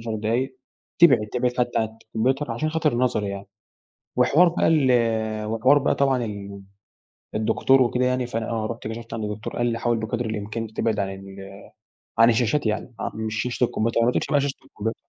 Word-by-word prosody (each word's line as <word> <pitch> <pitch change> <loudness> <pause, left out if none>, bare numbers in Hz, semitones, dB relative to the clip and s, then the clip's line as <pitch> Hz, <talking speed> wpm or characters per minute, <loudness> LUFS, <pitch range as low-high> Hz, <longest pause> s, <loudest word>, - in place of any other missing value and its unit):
10 115 -1 -4
دقايق 120 +5 -1 0.4
تبعد 130 -11 +6
تبعد 125 0 0
حتّى 120 0 +1
عن 110 - 0 0.2
الكمبيوتر 130 +6 -1
عشان 155 +7 -2
خاطر 155 -3 +1
النَظَر 120 -3 0
يعني. 100 0 -5 0.7
وحوار 150 +8 +5
بقى 170 - +1
ال 115 -7 +2
وحوار 115 +6 +3
بقى 140 - +1
طبعًا 135 -3 +1
ال 100 -2 -7 0.7
الدكتور 130 +5 +3
وكده 125 +1 +1
يعني 125 -1 0
فأنا 115 -1 -3
آه، 110 -2 -1
رُحت 115 0 -6
كشفت 115 +1 -7
عند 110 -1 -3
الدكتور 105 0 -5
قال 120 - +1
لي: 115 -1 -1
"حاول 120 -1 0
بقدر 110 +2 -3
الإمكان 110 +1 -4
تبعد 110 -2 0
عن 100 -1 -1
ال 95 0 -10 0.6
عن 115 +1 +7
الشاشات 120 +4 +1
يعني،" 110 +3 -2
آه. - - -3
مش 110 0 -3
شاشة 125 0 -2
الكمبيوتر 115 +1 0
ما 125 - +3
تقولش - - -1
بقى 145 - +4
شاشة 140 0 -1
الكمبيوت 110 +2 -4
115 Hz, 185 wpm, -24 LUFS, 110-125 Hz, 0.7 s, عن